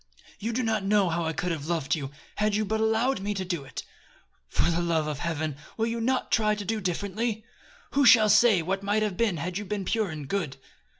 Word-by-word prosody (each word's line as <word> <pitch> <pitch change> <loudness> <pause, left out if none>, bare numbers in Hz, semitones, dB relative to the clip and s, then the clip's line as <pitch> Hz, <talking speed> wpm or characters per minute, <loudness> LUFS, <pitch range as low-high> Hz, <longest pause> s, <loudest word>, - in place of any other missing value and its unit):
You 225 +3 -2
do 250 +2 -1
not 220 -2 0
know 200 -2 +3
how 170 0 -1
I 160 - 0
could 180 +2 -2
have 155 -2 -4
loved 160 -5 0
you, 140 -4 -5 0.3
had 210 0 +1
you 215 +1 +1
but 220 +2 -1
allowed 220 +4 +2
me 205 +2 -2
to 190 -1 -3
do 175 -5 -3
it. 135 - -7 0.7
For 170 - +1
the 170 +1 0
love 165 -2 +1
of 150 -2 -3
Heaven! 155 -3 -2 0.2
will 225 - +1
you 230 0 -2
not 255 +3 0
try 215 -1 +3
to 205 -1 -6
do 220 +2 -1
differently? 205 +4 -2 0.5
Who 280 - +3
shall 225 -4 +7
say 210 -4 +5
what 190 +3 -1
might 205 +2 +1
have 205 -3 -1
been 210 -4 +1
had 175 +5 -3
you - - -5
been 200 -1 -3
pure 220 0 0
and 150 -3 -6
good?" 150 -7 -2
200 Hz, 235 wpm, -27 LUFS, 170-220 Hz, 0.7 s, shall